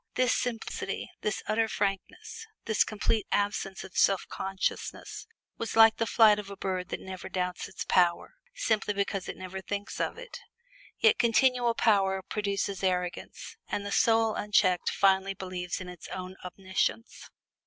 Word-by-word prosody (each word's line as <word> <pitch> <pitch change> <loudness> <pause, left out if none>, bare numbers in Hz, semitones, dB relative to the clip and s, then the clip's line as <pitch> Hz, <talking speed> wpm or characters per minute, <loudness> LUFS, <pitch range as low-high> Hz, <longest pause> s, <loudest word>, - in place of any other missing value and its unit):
This 255 -1 +3
simplicity, 235 -3 -3
this 210 - -2
utter 225 +1 +2
frankness, 435 - -3 0.2
this 220 - +3
complete 215 0 -1
absence 200 -2 -1
of 190 - -12
self 195 -1 +3
consciousness, 190 - -4 0.3
was 230 - -3
like 225 0 +7
the 225 - 0
flight 215 -2 +6
of 200 -1 -7
a 200 - -8
bird 185 -1 -3
that - - -4
never 185 -1 -8
doubts 180 -1 -2
its 180 - -6
power, 175 - +2 0.2
simply 210 -2 0
because 200 -1 -2
it - - -6
never 185 +1 -6
thinks 200 +1 -5
of - - -1
it. - - -9 0.6
Yet 455 0 +4
continual 240 0 +3
power 195 -4 +2
produces 200 -1 -2
arrogance, 180 -1 -3
and 205 - -3
the 200 - -4
soul 225 +1 +3
unchecked 185 -4 +2
finally 195 0 +2
believes 180 -2 -4
in 185 - -7
its 180 -2 -10
own 185 0 -6
omniscience. 190 +5 -3
200 Hz, 155 wpm, -29 LUFS, 185-225 Hz, 0.6 s, like